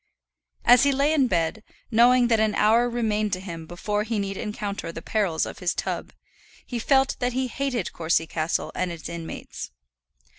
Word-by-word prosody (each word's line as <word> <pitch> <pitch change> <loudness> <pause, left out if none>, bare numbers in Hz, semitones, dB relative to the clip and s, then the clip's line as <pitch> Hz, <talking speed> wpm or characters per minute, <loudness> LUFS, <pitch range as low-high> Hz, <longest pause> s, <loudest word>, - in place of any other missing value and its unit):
As 245 0 +7
he 280 - +4
lay 280 +3 +2
in 275 -5 +3
bed, 175 +3 0 0.3
knowing 240 +2 +5
that 225 -2 +3
an 215 -1 +2
hour 230 +3 +4
remained 215 -3 0
to 185 - -1
him 165 -4 -7
before 205 +5 -2
he 220 +1 -2
need 195 -1 -2
encounter 205 -4 -4
the 165 - -7
perils 195 -7 0
of - - -8
his 180 -1 -1
tub, - - -3 0.5
he 245 - -4
felt 270 +3 +3
that 245 -1 0
he 260 +1 0
hated 250 -5 -2
Courcy 165 0 +1
Castle 160 0 -2
and 185 -1 -2
its 165 -2 -7
inmates. 170 -1 -7
215 Hz, 180 wpm, -25 LUFS, 175-245 Hz, 0.5 s, As